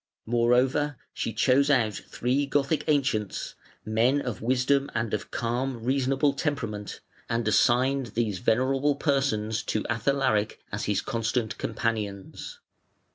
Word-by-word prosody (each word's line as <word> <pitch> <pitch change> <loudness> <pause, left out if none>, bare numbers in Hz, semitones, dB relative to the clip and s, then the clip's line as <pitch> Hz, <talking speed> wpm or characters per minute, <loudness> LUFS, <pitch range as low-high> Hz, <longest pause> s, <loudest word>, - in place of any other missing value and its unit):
Moreover, 125 +5 +2 0.2
she - - -2
chose 130 +6 +3
out 115 -7 +3
three 130 +7 -1
Gothic 145 +2 +1
ancients, 135 -9 0 0.3
men 115 +6 +2
of 125 -8 -4
wisdom 130 +4 +2
and 110 -1 -1
of 105 - -2
calm, 120 +1 -2
reasonable 135 +2 +2
temperament, 130 - -3 0.3
and 115 -1 0
assigned 130 +4 +3
these 110 -5 -2
venerable 135 +6 +2
persons 135 -7 0
to 110 - -1
Athalaric 115 -2 +1
as 100 - -3
his 105 -2 +1
constant 115 -2 -1
companions. 110 -4 -3
125 Hz, 120 wpm, -27 LUFS, 110-135 Hz, 0.3 s, chose